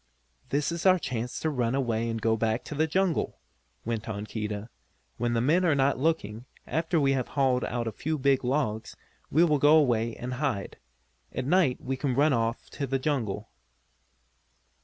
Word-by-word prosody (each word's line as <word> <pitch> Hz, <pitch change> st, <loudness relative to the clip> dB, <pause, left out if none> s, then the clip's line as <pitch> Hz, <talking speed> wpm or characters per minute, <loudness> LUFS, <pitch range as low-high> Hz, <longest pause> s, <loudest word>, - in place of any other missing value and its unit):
"This 145 Hz, +2 st, 0 dB
is 170 Hz, +2 st, 0 dB
our 185 Hz, 0 st, +6 dB
chance 125 Hz, -7 st, -4 dB
to 160 Hz, -, 0 dB
run 125 Hz, -3 st, 0 dB
away 115 Hz, -4 st, 0 dB
and 115 Hz, 0 st, -2 dB
go 110 Hz, 0 st, +2 dB
back 110 Hz, +1 st, 0 dB
to -, -, -7 dB
the 155 Hz, +2 st, +1 dB
jungle," 185 Hz, +1 st, 0 dB, 0.5 s
went 115 Hz, -1 st, -3 dB
on 105 Hz, -1 st, -4 dB
Keedah. 105 Hz, -1 st, -4 dB, 0.5 s
"When 120 Hz, 0 st, 0 dB
the 115 Hz, -, +1 dB
men 160 Hz, +9 st, +3 dB
are 165 Hz, -5 st, +3 dB
not 135 Hz, 0 st, +2 dB
looking, 125 Hz, -7 st, -1 dB, 0.2 s
after 165 Hz, +1 st, 0 dB
we 140 Hz, -2 st, +3 dB
have 130 Hz, -3 st, 0 dB
hauled 130 Hz, -3 st, +1 dB
out 120 Hz, -1 st, -2 dB
a 115 Hz, -, -2 dB
few 155 Hz, +9 st, -3 dB
big 135 Hz, -1 st, +2 dB
logs, 125 Hz, -5 st, -1 dB, 0.3 s
we 160 Hz, +4 st, +4 dB
will 150 Hz, -4 st, +3 dB
go 150 Hz, +3 st, +6 dB
away 115 Hz, -6 st, +2 dB
and 125 Hz, +1 st, -5 dB
hide. 125 Hz, -9 st, -2 dB, 0.5 s
At 130 Hz, -, -3 dB
night 155 Hz, -4 st, +3 dB
we 130 Hz, +1 st, -3 dB
can 130 Hz, -2 st, -1 dB
run 145 Hz, +2 st, +4 dB
off 115 Hz, 0 st, -1 dB
to 140 Hz, -, -3 dB
the 135 Hz, +1 st, 0 dB
jungle." 115 Hz, -7 st, -2 dB
130 Hz, 185 wpm, -28 LUFS, 115-150 Hz, 0.5 s, our